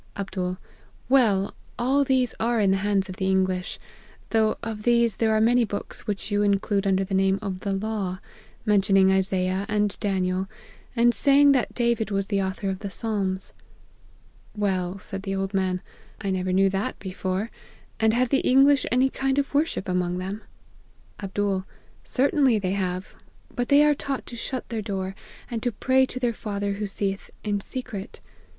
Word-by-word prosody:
" -, -, -32 dB
Md. 185 Hz, -2 st, -3 dB, 0.3 s
' -, -, -31 dB
Well! 215 Hz, -7 st, +3 dB, 0.2 s
all 270 Hz, +4 st, +2 dB
these 260 Hz, -3 st, +2 dB
are 235 Hz, +1 st, +1 dB
in 200 Hz, -2 st, +3 dB
the 195 Hz, -, +3 dB
hands 195 Hz, -1 st, +1 dB
of 185 Hz, 0 st, -8 dB
the 190 Hz, 0 st, 0 dB
English; 185 Hz, -1 st, 0 dB, 0.5 s
though 220 Hz, -1 st, +2 dB
of 220 Hz, -2 st, -4 dB
these 235 Hz, -2 st, +3 dB
there 225 Hz, -1 st, +2 dB
are 220 Hz, -, +3 dB
many 240 Hz, +2 st, +4 dB
books 205 Hz, +1 st, -5 dB
which 205 Hz, 0 st, -3 dB
you 205 Hz, 0 st, +2 dB
include 200 Hz, 0 st, +1 dB
under 195 Hz, 0 st, +2 dB
the 190 Hz, -, -5 dB
name 190 Hz, 0 st, +3 dB
of 195 Hz, -3 st, -4 dB
the 200 Hz, -, -3 dB
law 195 Hz, -2 st, -2 dB, 0.2 s
;' -, -, -28 dB
mentioning 195 Hz, -2 st, +4 dB
Isaiah 190 Hz, 0 st, +1 dB
and 210 Hz, -1 st, +1 dB
Daniel, 190 Hz, -2 st, 0 dB, 0.5 s
and 240 Hz, 0 st, +4 dB
saying 285 Hz, +2 st, +5 dB
that 265 Hz, -3 st, +1 dB
Da 235 Hz, -1 st, +3 dB
vid 220 Hz, -2 st, -3 dB
was 195 Hz, -1 st, 0 dB
the 200 Hz, -1 st, 0 dB
author 190 Hz, +1 st, -3 dB
of 190 Hz, -, -5 dB
the 200 Hz, -, -5 dB
Psalms. 195 Hz, -3 st, -2 dB, 0.4 s
" -, -, -31 dB
< -, -, -31 dB
Well,' 190 Hz, -2 st, 0 dB
said 195 Hz, 0 st, -6 dB
the 195 Hz, 0 st, -3 dB
old 195 Hz, +1 st, -2 dB
man, 185 Hz, -1 st, 0 dB, 0.2 s
' -, -, -27 dB
I 200 Hz, -2 st, -2 dB
never 185 Hz, 0 st, -1 dB
knew 195 Hz, +1 st, +4 dB
that 200 Hz, +6 st, -2 dB
before; 190 Hz, +2 st, -3 dB, 0.5 s
and 220 Hz, 0 st, +4 dB
have 250 Hz, 0 st, +2 dB
the 270 Hz, -, +3 dB
English 275 Hz, +1 st, +4 dB
any 255 Hz, +2 st, +4 dB
kind 270 Hz, 0 st, 0 dB
of 280 Hz, 0 st, 0 dB
worship 290 Hz, -9 st, 0 dB
among 180 Hz, -1 st, 0 dB
them 190 Hz, +4 st, -4 dB, 0.3 s
?' -, -, -31 dB
" -, -, -32 dB
Jlbd. 195 Hz, -1 st, -1 dB, 0.2 s
' -, -, -31 dB
Certainly 270 Hz, -2 st, +3 dB
they 190 Hz, -3 st, -1 dB
have: 185 Hz, -1 st, -3 dB, 0.4 s
but 245 Hz, -1 st, -1 dB
they 285 Hz, +1 st, +7 dB
are 300 Hz, -, +5 dB
taught 275 Hz, -1 st, -4 dB
to 240 Hz, -, -8 dB
shut 255 Hz, +2 st, -4 dB
their 225 Hz, -2 st, -2 dB
door, 195 Hz, -2 st, -3 dB, 0.4 s
and 230 Hz, -2 st, -2 dB
to 245 Hz, -, 0 dB
pray 260 Hz, +4 st, +2 dB
Jo 255 Hz, -, -7 dB
their 245 Hz, -2 st, 0 dB
Father 200 Hz, -2 st, -3 dB
who 205 Hz, +1 st, -3 dB
seeth 195 Hz, 0 st, -3 dB
in 205 Hz, -1 st, 0 dB
secret. 220 Hz, -3 st, -6 dB
205 Hz, 195 wpm, -25 LUFS, 190-235 Hz, 0.5 s, they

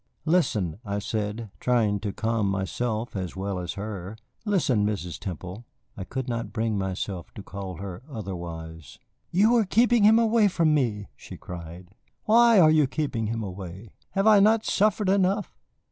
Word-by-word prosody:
"Listen," 110 Hz, -, +1 dB
I 100 Hz, -2 st, -3 dB
said, 105 Hz, +1 st, -3 dB
trying 110 Hz, -5 st, +1 dB
to 105 Hz, -1 st, -3 dB
calm 110 Hz, 0 st, -1 dB
myself 110 Hz, +4 st, -2 dB
as 95 Hz, -3 st, -4 dB
well 95 Hz, 0 st, -3 dB
as 90 Hz, -2 st, -4 dB
her. 100 Hz, 0 st, -6 dB, 0.3 s
"Listen, 160 Hz, -, +2 dB
Mrs. 95 Hz, -6 st, -3 dB
Temple." 95 Hz, +4 st, -7 dB, 0.3 s
I 95 Hz, -, -6 dB
could 130 Hz, +3 st, -4 dB
not 115 Hz, -2 st, -3 dB
bring 110 Hz, -1 st, -1 dB
myself 95 Hz, -2 st, -4 dB
to 100 Hz, -, -8 dB
call 95 Hz, -2 st, -7 dB
her 95 Hz, +1 st, -7 dB
otherwise. 85 Hz, -, -7 dB, 0.3 s
"You 215 Hz, +7 st, +4 dB
are 225 Hz, -, +4 dB
keeping 230 Hz, +3 st, +3 dB
him 220 Hz, +2 st, +7 dB
away 225 Hz, -2 st, +4 dB
from 165 Hz, -5 st, +2 dB
me," 115 Hz, -8 st, 0 dB
she -, -, -11 dB
cried. 85 Hz, 0 st, -9 dB, 0.3 s
"Why 230 Hz, 0 st, +6 dB
are 155 Hz, -3 st, +7 dB
you 155 Hz, -3 st, +4 dB
keeping 130 Hz, -6 st, -2 dB
him 115 Hz, 0 st, -3 dB
away? 95 Hz, +1 st, -8 dB, 0.2 s
Have 195 Hz, +1 st, +1 dB
I 215 Hz, -2 st, +7 dB
not 215 Hz, +2 st, +4 dB
suffered 210 Hz, 0 st, +2 dB
enough? 195 Hz, +1 st, +1 dB
110 Hz, 160 wpm, -26 LUFS, -, 0.3 s, him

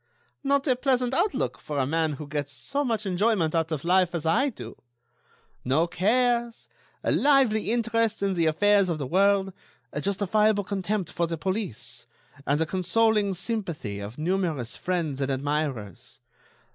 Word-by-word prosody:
"Ha! -, -, -41 dB, 0.2 s
not 280 Hz, 0 st, +2 dB
a 255 Hz, -, +4 dB
pleasant 255 Hz, -1 st, +1 dB
outlook 365 Hz, +8 st, 0 dB
for 150 Hz, -, -5 dB
a 135 Hz, -, +2 dB
man 160 Hz, +2 st, 0 dB
who 150 Hz, +2 st, -7 dB
gets 145 Hz, -1 st, -4 dB
so 270 Hz, -, -2 dB
much 225 Hz, -5 st, -1 dB
enjoyment 190 Hz, -3 st, +1 dB
out 165 Hz, -1 st, 0 dB
of 150 Hz, -3 st, -3 dB
life 180 Hz, 0 st, +2 dB
as 165 Hz, -1 st, -3 dB
I 240 Hz, -, +3 dB
do. 250 Hz, -, -10 dB, 0.8 s
No 140 Hz, +6 st, +2 dB
cares, 235 Hz, +6 st, 0 dB, 0.4 s
a -, -, +1 dB
lively 265 Hz, -8 st, +3 dB
interest 230 Hz, -2 st, 0 dB
in 195 Hz, -1 st, +1 dB
the 170 Hz, -3 st, +1 dB
affairs 200 Hz, +4 st, +3 dB
of 165 Hz, -, -1 dB
the 145 Hz, -, -3 dB
world, 195 Hz, +4 st, +2 dB, 0.4 s
a 150 Hz, -, -3 dB
justifiable 205 Hz, +2 st, +2 dB
contempt 195 Hz, -1 st, -2 dB
for 170 Hz, -1 st, -1 dB
the 165 Hz, 0 st, -3 dB
police, 125 Hz, -, -4 dB, 0.4 s
and 145 Hz, +2 st, +2 dB
the 160 Hz, -, +2 dB
consoling 200 Hz, +3 st, +1 dB
sympathy 175 Hz, -, -4 dB
of 100 Hz, +4 st, -7 dB
numerous 160 Hz, -7 st, -1 dB
friends 165 Hz, -7 st, -2 dB
and 135 Hz, -, 0 dB
admirers. 135 Hz, -4 st, -3 dB
185 Hz, 160 wpm, -26 LUFS, 150-220 Hz, 0.8 s, a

